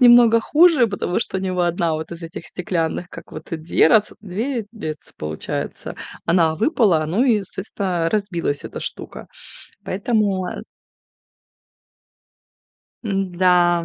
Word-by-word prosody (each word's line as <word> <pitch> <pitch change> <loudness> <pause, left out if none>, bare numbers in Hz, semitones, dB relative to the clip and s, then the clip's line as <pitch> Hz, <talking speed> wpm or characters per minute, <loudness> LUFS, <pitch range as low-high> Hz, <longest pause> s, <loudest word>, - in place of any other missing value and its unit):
немного 240 -2 +7
хуже, 305 -3 +5
потому 200 -3 -1
что 190 - -2
у - - -4
него 185 -2 -1
1 170 -1 +1
вот 160 +2 -5
из 170 0 -9
этих 165 0 -8
стеклянных, 175 -1 -2
как - - -12
вот, 155 +1 -9
э, 165 - 0
дверац 170 +6 +3
дверец 220 +4 -3
дверец, 155 -9 -7
получается, 75 0 -5 0.3
она 170 -2 +3
выпала, 210 - +2
ну 205 - +1
и, 220 -6 +3
соответственно, 185 -3 -2
разбилась 175 -8 -1
эта - - -6
штука. - - -7 0.6
Поэтому, 200 -2 0
э - - -5 2.4
М-да. 180 -3 +2
185 Hz, 125 wpm, -21 LUFS, 170-215 Hz, 2.4 s, немного